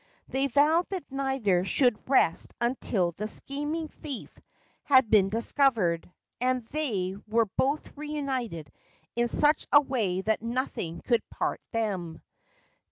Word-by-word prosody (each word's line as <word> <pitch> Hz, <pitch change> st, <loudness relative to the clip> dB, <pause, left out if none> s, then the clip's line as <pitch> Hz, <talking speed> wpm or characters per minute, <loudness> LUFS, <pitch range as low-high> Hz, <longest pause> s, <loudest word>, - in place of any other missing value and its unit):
They 270 Hz, +1 st, 0 dB
vowed 300 Hz, +6 st, +3 dB
that 370 Hz, -8 st, -5 dB
neither 265 Hz, -10 st, +1 dB
should 245 Hz, +3 st, +1 dB
rest 215 Hz, -11 st, +2 dB
until 235 Hz, -7 st, 0 dB
the 210 Hz, +5 st, -5 dB
scheming 295 Hz, +7 st, -2 dB
thief 290 Hz, -4 st, -7 dB, 0.5 s
had 260 Hz, -6 st, +4 dB
been 200 Hz, -3 st, +5 dB
discovered, 220 Hz, -, +1 dB, 0.3 s
and 250 Hz, -1 st, 0 dB
they 205 Hz, -12 st, -2 dB
were 225 Hz, +1 st, +3 dB
both 280 Hz, +3 st, 0 dB
reunited 265 Hz, -, -4 dB, 0.4 s
in 240 Hz, 0 st, +2 dB
such 295 Hz, +5 st, +2 dB
a 290 Hz, -, +9 dB
way 225 Hz, -10 st, -1 dB
that 215 Hz, +2 st, 0 dB
nothing 230 Hz, -8 st, -3 dB
could 235 Hz, -2 st, +2 dB
part -, -, -2 dB
them. 190 Hz, -8 st, -3 dB
245 Hz, 125 wpm, -28 LUFS, 200-280 Hz, 0.5 s, a